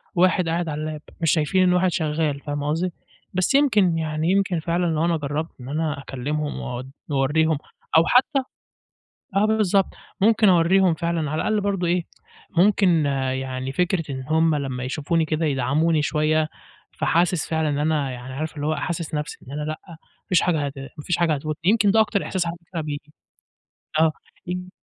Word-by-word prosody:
واحد 180 -1 +3
قاعد 170 0 -1
على 150 +1 -3
اللاب، 155 -1 -4 0.2
مش 160 -4 +3
شايفين 180 +4 +2
إني 180 0 +4
واحد 180 0 +3
شغال، 155 -3 -1
فاهم 145 0 -4
قصدي، 165 +5 0 0.4
بس 185 +8 +1
يمكن، 210 - +4
يعني 160 +2 -1
يمكن 190 -3 +1
فعلًا 170 +2 0
لو 160 0 +1
أنا 170 -1 +2
جرّبت 150 +2 -3
إن 125 - -8
أنا 155 -1 -1
أكلمهم 145 +3 -3
وأود 125 +2 -6 0.2
وأوريهم 150 +3 +2 0.4
أو 165 - +7
حتى 270 +3 +4 1.0
آه 205 +2 +4
بالضبط، 210 -3 +2 0.3
ممكن 215 -1 +5
أوريهم 180 +1 +4
فعلًا، 165 -2 -1
على 155 - -1
الأقل 215 -1 +1
برضه 195 -3 0
إيه، 175 0 +1 0.5
ممكن 180 -5 +4 0.3
يعني 130 0 -4
فكرة 180 +2 0
إن 130 -1 -5
هُم 160 0 +3
لمّا 130 -3 -3
يشوفوني 155 +5 0
كده 155 +1 -1
يدعموني 150 +4 +1
شوية، 155 +1 +1 0.5
فحاسس 170 -1 +1
فعلًا 160 -1 +1
إن 145 - -1
أنا 150 -3 0
يعني 125 +1 -8
عارف 155 +3 -4
اللي 145 +1 -3
هو 155 - +1
حاسس 160 +1 -3
نَفْسي 150 0 -4
إن - - -9
أنا 150 +1 -4
لأ 155 +1 -4
ما 165 - -10 0.3
فيش 180 - +4
حاجة 160 -5 +1
هت 140 - -4
ما 135 +3 -9
فيش 175 - 0
حاجة 170 -3 +2
هتو 155 +2 -3
يمكن 205 +1 +4
ده 220 +1 +5
أكتر 205 -2 0
إحساس 180 -3 -1
على 170 - -3
فكرة 170 -2 -4
بييجي، 150 0 -6 0.9
آه 160 -1 +4 0.3
ي 180 +1 -4
160 Hz, 180 wpm, -23 LUFS, 150-180 Hz, 1.0 s, أو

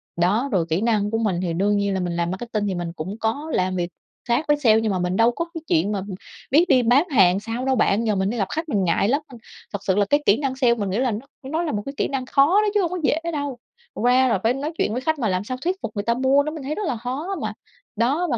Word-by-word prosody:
Đó, 205 +10 +1
rồi 180 -6 +1
kỹ 160 +4 0
năng 215 -3 +1
của 225 - +1
mình 205 -6 0
thì 175 -2 -2
đương 200 +4 +1
nhiên 200 -1 0
là 190 - -1
mình 175 -2 -2
làm 170 0 -1
marketing 210 +1 -3
thì 190 - -1
mình 175 -1 -4
cũng 185 +7 -5
có 230 +8 -2
làm 185 0 0
việc 175 -1 -2 0.4
khác 240 +6 +1
với 295 0 +3
sale, 225 -6 +4
nhưng 220 -2 0
mà 185 - -1
mình 180 +1 -1
đâu 230 +1 +5
có 335 +8 -3
cái 330 - -6
chuyện 170 +6 +2
mà 200 -2 -2 0.5
biết 310 +6 +5
đi 255 -5 +5
bán 265 +9 +3
hàng 190 - +4
sao 230 +4 -4
đâu 265 0 +2
bạn, 225 -1 +2
giờ 215 - +2
mình 190 0 0
đi 240 - -3
gặp 195 -3 0
khách 320 +1 -3
mình 205 -7 +1
ngại 180 +2 +2
lắm. 280 +4 +2
Ơ, 255 -4 -12 0.4
thật 200 - -2
sự 190 -2 +1
là 205 0 +3
cái 290 +8 +1
kỹ 200 - +5
năng 275 -2 -2
sale 250 -3 +3
mình 205 -4 -3
nghĩ 190 - -1
là 250 0 +1
nó 210 - -3 0.2
nó 310 +5 -2
là 325 - -2
một 205 - -2
cái 275 - -5
kỹ - - +1
năng 270 -2 -3
khó 275 +2 +4 0.2
đó 425 - +1
chứ 415 - +3
hông 350 -2 -1
có 365 - -2
dễ 295 - +2 0.2
đâu, 285 -4 -3 0.4
qua 250 +3 +3
là 225 -6 +1
phải 230 +2 +3
nói 285 +4 -3
chuyện - - 0
với 250 - -2
khách 315 +2 0
mà 225 -5 0
làm 185 0 0
sao 255 +4 -4
thuyết 360 +5 0
phục - - -4
người 205 - -2
ta 235 - +2
mua, 265 +3 +3
nó 305 - -3
mình 310 -3 -7
thấy 290 +3 -3
rất 420 - -3
là 250 - -1
khó 270 - -4
mà. - - -3 0.4
Đó, 275 +11 +1
và 240 - +1
230 Hz, 305 wpm, -23 LUFS, 200-275 Hz, 0.5 s, đâu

